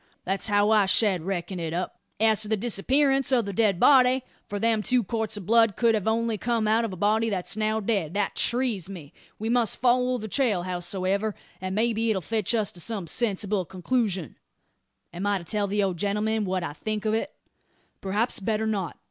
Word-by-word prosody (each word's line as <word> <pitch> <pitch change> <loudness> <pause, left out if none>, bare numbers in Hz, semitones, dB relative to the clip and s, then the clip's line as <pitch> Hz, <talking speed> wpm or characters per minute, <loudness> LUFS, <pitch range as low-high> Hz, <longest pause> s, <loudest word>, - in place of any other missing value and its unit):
That's 195 +3 -1
how 205 0 +3
I 210 -3 +4
shed 190 -3 +3
reckon 185 -1 -3
it 165 -1 -3
up. 180 - -4 0.2
As 220 -1 +3
to 215 - 0
the 220 0 0
disappearance 270 +6 +1
o' 250 -3 +3
the 200 -1 -5
dead 200 -3 +2
body 255 0 +5 0.2
for 205 - -4
them 225 +1 +1
two 250 +2 +2
quarts 220 0 -2
o' - - -5
blood 225 +2 +3
could 235 -2 +3
only 225 0 0
have - - -20
come 230 -2 0
out 220 +2 +3
o' 230 - -2
a - - -6
body 215 +4 +1
that's 190 -3 -1
now 215 0 0
dead 195 -6 -1
that 205 -1 0
trees 235 -7 0
me. 170 -5 -10 0.2
We 220 - -4
must 235 -2 +1
follow 250 0 +2
the 220 -2 -6
trail, 215 -6 +1
howsoever; 185 +3 -2 0.3
and 185 0 -3
maybe 225 +1 +1
it'll 190 -5 0
fetch 220 +2 0
us 215 -3 0
to 175 - -12
some 200 +1 -3
sensible 205 0 -1
concloosion. 190 - -2 0.8
Am 185 +4 -3
I 205 -1 +2
to 180 - -8
tell 205 +3 -1
the 205 +1 0
old 190 -3 -1
gentleman 210 +3 0
what 185 -1 -1
I 145 - -4
think 215 +5 -4
o't?" 220 +4 0 0.7
"Perhaps 205 +5 0
better 215 +2 -1
not. 205 -5 -2
215 Hz, 200 wpm, -26 LUFS, 190-230 Hz, 0.8 s, body